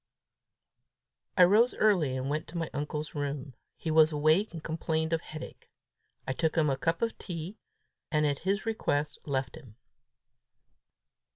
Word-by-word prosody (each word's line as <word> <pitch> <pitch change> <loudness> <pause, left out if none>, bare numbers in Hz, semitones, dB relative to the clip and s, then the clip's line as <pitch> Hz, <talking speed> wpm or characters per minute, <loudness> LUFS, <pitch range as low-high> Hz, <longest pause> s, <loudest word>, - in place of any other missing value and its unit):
I 180 - +9
rose 215 +7 +5
early, 175 -12 +3
and 130 +1 -3
went 150 +2 -2
to 170 - -7
my 165 -1 -3
uncle's 150 +2 -4
room. 145 -2 -4 0.2
He 160 - -3
was 155 0 +6
awake, 155 +7 +3
but 165 -2 -8
complained 160 0 -1
of 165 - +1
headache. 155 - -10 0.6
I 130 - -1
took 160 +3 0
him 155 -4 +3
a - - +1
cup 165 +8 -1
of 230 - -2
tea, 175 +4 -6 0.5
and 150 -1 +2
at 145 -1 0
his 200 +3 -1
request 150 -10 -1
left 135 -2 -1
him. 125 -9 -14
155 Hz, 155 wpm, -30 LUFS, 145-170 Hz, 0.6 s, I